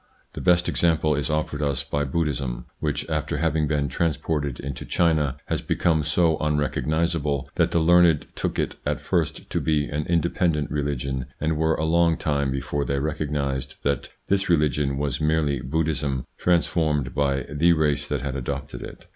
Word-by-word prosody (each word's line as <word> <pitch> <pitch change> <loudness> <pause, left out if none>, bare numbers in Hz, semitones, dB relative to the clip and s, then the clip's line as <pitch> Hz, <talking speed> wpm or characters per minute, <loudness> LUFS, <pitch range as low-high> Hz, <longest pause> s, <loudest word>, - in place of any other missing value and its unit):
The - - -6
best 90 -1 +3
example 80 -2 +2
is 75 +1 -1
offered 75 -1 -1
us 70 -2 0
by 70 0 -1
Buddhism, 65 -5 -2
which, 75 -1 -2
after - - -1
having 80 -2 +1
been 75 -1 0
transported 75 -1 -1
into 70 -1 -5
China, 75 -5 +1
has - - -2
become 80 -3 +1
so 80 +1 +2
unrecognisable 75 0 0
that - - +2
the - - 0
learned 85 -1 +5
took - - -2
it - - -1
at - - -1
first - - -1
to - - 0
be 75 -2 +1
an 75 +1 -3
independent 85 -3 +1
religion 70 -3 -2
and 80 +1 0
were 80 +1 +2
a 80 - -1
long 85 0 +3
time 70 -2 0
before 70 +2 -2
they 70 0 -1
recognised 70 -2 -2
that 70 -3 -1 0.2
this 100 -1 +1
religion 75 -4 +2
was 70 -2 -1
merely 75 -3 +1
Buddhism 70 -2 -1
transformed 80 -5 +1
by 70 -2 0
the 85 +4 +3
race 75 -2 +1
that - - -2
had 70 -1 -3
adopted 70 -2 -4
it. - - -10
75 Hz, 165 wpm, -24 LUFS, 70-80 Hz, 0.2 s, learned